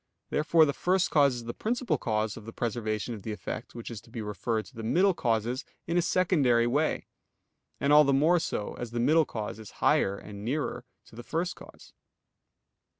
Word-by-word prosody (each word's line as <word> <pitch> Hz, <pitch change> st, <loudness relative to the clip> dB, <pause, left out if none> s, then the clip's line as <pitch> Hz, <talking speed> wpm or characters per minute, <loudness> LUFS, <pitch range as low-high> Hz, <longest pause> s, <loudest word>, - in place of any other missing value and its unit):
Therefore 160 Hz, +1 st, +4 dB
the 145 Hz, -, 0 dB
first 185 Hz, +4 st, +1 dB
cause 140 Hz, -4 st, +4 dB
is 120 Hz, -, -6 dB
the 120 Hz, 0 st, -5 dB
principal 225 Hz, -, -1 dB
cause 110 Hz, -2 st, -1 dB
of 110 Hz, -, -10 dB
the 115 Hz, -, -7 dB
preservation 115 Hz, -1 st, -2 dB
of 105 Hz, -, -7 dB
the 110 Hz, -, -5 dB
effect 110 Hz, +2 st, -6 dB
which 120 Hz, 0 st, -7 dB
is 110 Hz, -4 st, -7 dB
to -, -, -20 dB
be 115 Hz, -1 st, -5 dB
referred 105 Hz, +2 st, -2 dB
to 125 Hz, -, -17 dB
the 115 Hz, -, -6 dB
middle 185 Hz, -, +3 dB
causes 120 Hz, -1 st, -1 dB, 0.2 s
in 170 Hz, -, -2 dB
a 175 Hz, -, +4 dB
secondary 165 Hz, -10 st, +3 dB
way; 145 Hz, +6 st, 0 dB, 0.7 s
and 140 Hz, +1 st, +3 dB
all 150 Hz, 0 st, +9 dB
the 140 Hz, -, +2 dB
more 155 Hz, +6 st, +4 dB
so, 105 Hz, -9 st, -3 dB
as 120 Hz, -, -4 dB
the 120 Hz, +1 st, -3 dB
middle 155 Hz, +6 st, +4 dB
cause 110 Hz, -2 st, -5 dB
is 110 Hz, -, -11 dB
higher 100 Hz, +1 st, +2 dB
and 100 Hz, 0 st, -9 dB
nearer 135 Hz, +1 st, -2 dB, 0.2 s
to -, -, -17 dB
the 120 Hz, -, -7 dB
first 165 Hz, +8 st, -2 dB
cause. -, -, -15 dB
120 Hz, 205 wpm, -28 LUFS, 110-155 Hz, 0.7 s, all